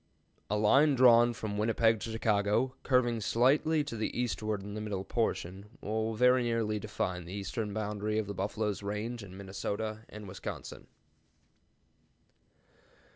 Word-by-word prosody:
A 105 - +1
line 135 +8 +5
drawn 120 -2 +6
from 110 -3 -4
Winnipeg 115 0 +3
to 115 - -5
Chicago, 110 +3 +1
curving 120 -3 +2
slightly 145 +8 +3
to 145 -5 -6
the 110 +2 -3
eastward 110 -4 -2
in 100 +1 -7
the 105 - -4
middle 100 -3 -3
portion, 100 -2 -3
will 110 +2 -2
very 125 +2 +5
nearly 115 -3 0
define 90 -4 -3
the 90 - -8
eastern 105 +2 -3
boundary 105 0 -2
of 110 - 0
the 100 - -5
buffalo's 105 +2 -2
range 105 +4 -4
in 95 -2 -10
Minnesota 100 +3 -4
and 105 -1 -9
Wisconsin. 95 +1 -7
110 Hz, 140 wpm, -31 LUFS, 100-115 Hz, -, drawn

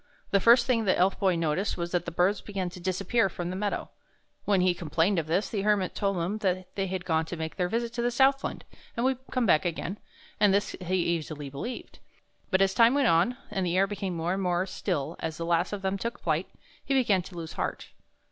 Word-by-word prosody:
The 200 - +4
first 235 +4 +6
thing 230 -4 +1
the 185 - +3
Elf 185 +2 +2
Boy 190 -3 +3
noticed 165 +4 -1
was 170 0 -3
that 175 - 0
the 170 - -4
birds 180 +4 +2
began 190 -3 -4
to 180 - -10
disappear 195 +5 +1
from 175 0 -4
the - - -4
meadows. 205 +1 -2 0.6
When 200 -3 +3
he 180 0 +3
complained 170 +3 +1
of 155 - -4
this, 180 +6 +1
the 205 - -2
Hermit 200 -2 +1
told 195 -2 -1
him 180 +6 -2 0.4
they 195 -1 -1
had 185 -1 -4
gone 160 -1 +1
to 175 - -6
make 160 0 -4
their 180 -1 0
visit 235 +2 -2
to 235 - -2
the 240 - +2
Southland, 270 +3 +1 0.3
and 235 - 0
would 260 -1 +1
come 255 -2 0
back 155 -6 +4
again; 175 +3 -3 0.4
and 205 -1 +5
this 205 - +1
he 185 +1 -1
easily 155 -5 -2
believed.' 230 - -6 0.5
But 190 -1 +4
as 190 0 +1
time 230 +4 +5
went 280 -4 +3
on, 175 +10 +3
and 195 -3 -1
the 180 0 0
air 195 - +5
became 195 -3 -4
more 165 +2 -1
and 195 - -2
more 180 0 +1
still 170 -5 -3
as 160 -1 -4
the 165 - -3
last 170 +1 +1
of 205 -2 -5
them 190 +1 -1
took 230 +4 -3
their - - -32
flight, - - 0 0.3
he 275 - 0
began 215 -8 +3
to 180 0 -12
lose 165 -1 -6
heart. - - -4
190 Hz, 235 wpm, -28 LUFS, 170-210 Hz, 0.6 s, first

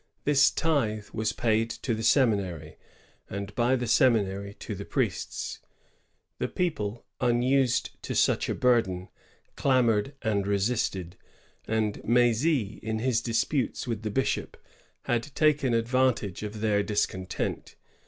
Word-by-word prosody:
This 140 -1 +5
tithe 115 -11 0
was 110 +1 0
paid 115 0 +1
to 115 - -3
the 110 - -3
seminary, 100 - +1 0.5
and 100 +1 -5
by 120 +2 +2
the 125 -1 -2
seminary 100 -5 +2
to - - -6
the - - -6
priests. - - -2 0.8
The - - 0
people, 120 - -2
unused 125 +1 +1
to - - -4
such - - +2
a - - 0
burden, 95 -8 +1 0.5
clamored 130 -1 +2
and 100 -3 0
resisted; 100 -3 -1 0.5
and 110 -2 -1
M^zy, 120 0 +2
in 110 0 -3
his 120 0 +1
disputes 120 +2 -1
with 115 -4 -3
the 110 - -3
bishop, 130 +6 -1 0.5
had 120 -1 +1
taken 145 -5 +3
advantage 115 -4 +1
of 105 0 -6
their 105 -2 +2
discontent. 95 -2 -2
115 Hz, 125 wpm, -27 LUFS, 105-125 Hz, 0.8 s, This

